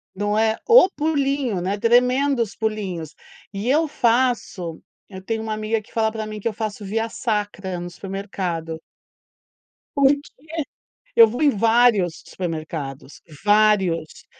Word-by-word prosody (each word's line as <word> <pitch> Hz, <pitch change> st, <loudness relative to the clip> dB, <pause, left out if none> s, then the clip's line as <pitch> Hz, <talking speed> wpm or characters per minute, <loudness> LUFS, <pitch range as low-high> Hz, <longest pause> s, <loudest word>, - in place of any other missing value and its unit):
Não 205 Hz, +1 st, -1 dB
é 220 Hz, 0 st, +2 dB
"o 455 Hz, -5 st, +8 dB
pulinho", 280 Hz, -, 0 dB
né. 195 Hz, +3 st, -1 dB
"Tremendos 250 Hz, +1 st, +2 dB
pulinhos", 190 Hz, -8 st, -3 dB, 0.4 s
e 205 Hz, +5 st, -3 dB
eu 310 Hz, +3 st, +3 dB
faço 235 Hz, -, 0 dB, 0.3 s
eu 190 Hz, -1 st, -9 dB
tenho 225 Hz, +3 st, -3 dB
uma 220 Hz, -1 st, -3 dB
amiga 215 Hz, +1 st, -1 dB
que -, -, -22 dB
fala 220 Hz, -1 st, +1 dB
pra 220 Hz, 0 st, -5 dB
mim, 215 Hz, 0 st, -6 dB
que 210 Hz, -, -3 dB
eu 225 Hz, -, -1 dB
faço 215 Hz, -1 st, -5 dB
via 225 Hz, +3 st, -1 dB
sacra 205 Hz, -6 st, -3 dB
no 175 Hz, -, -6 dB
supermercado. 175 Hz, -3 st, -5 dB, 1.2 s
Por 280 Hz, -1 st, +5 dB
quê? -, -, -2 dB, 1.0 s
Eu 230 Hz, -1 st, +9 dB
vou 245 Hz, +7 st, -5 dB
em 295 Hz, -, +5 dB
vários 225 Hz, -6 st, +3 dB
supermercados. 155 Hz, -6 st, -6 dB, 0.2 s
Vários. 205 Hz, -6 st, +2 dB
215 Hz, 140 wpm, -22 LUFS, 190-235 Hz, 1.2 s, Eu